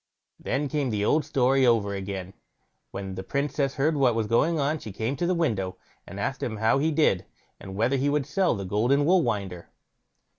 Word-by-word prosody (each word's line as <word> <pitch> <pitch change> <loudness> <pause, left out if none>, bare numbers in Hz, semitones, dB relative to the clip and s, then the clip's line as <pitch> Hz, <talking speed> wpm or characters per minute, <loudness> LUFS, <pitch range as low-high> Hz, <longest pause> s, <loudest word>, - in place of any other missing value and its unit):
Then 140 +3 -1
came 140 -1 -1
the 105 -2 -1
old 150 +4 +2
story 135 -2 +2
over 115 -5 +3
again. 95 -1 -5 0.6
When 95 -1 -6
the 95 - -5
Princess 140 +5 -1
heard 150 +3 +1
what 130 -5 +3
was 115 -1 0
going 155 +9 +2
on, 145 +2 0
she 110 - -8
came 110 +7 -2
to 175 - -1
the 180 - +1
window, 105 - -1 0.3
and - - -8
asked - - -2
him 110 - -3
how 110 +5 +2
he 155 +3 +2
did, 145 - +2 0.4
and 95 0 -9
whether 120 +7 +1
he 140 +2 +1
would 145 -1 0
sell 180 +1 +1
the 100 -2 -5
golden 120 +9 +2
wool 180 +3 +4
winder? 100 - -3
130 Hz, 200 wpm, -26 LUFS, 100-145 Hz, 0.6 s, wool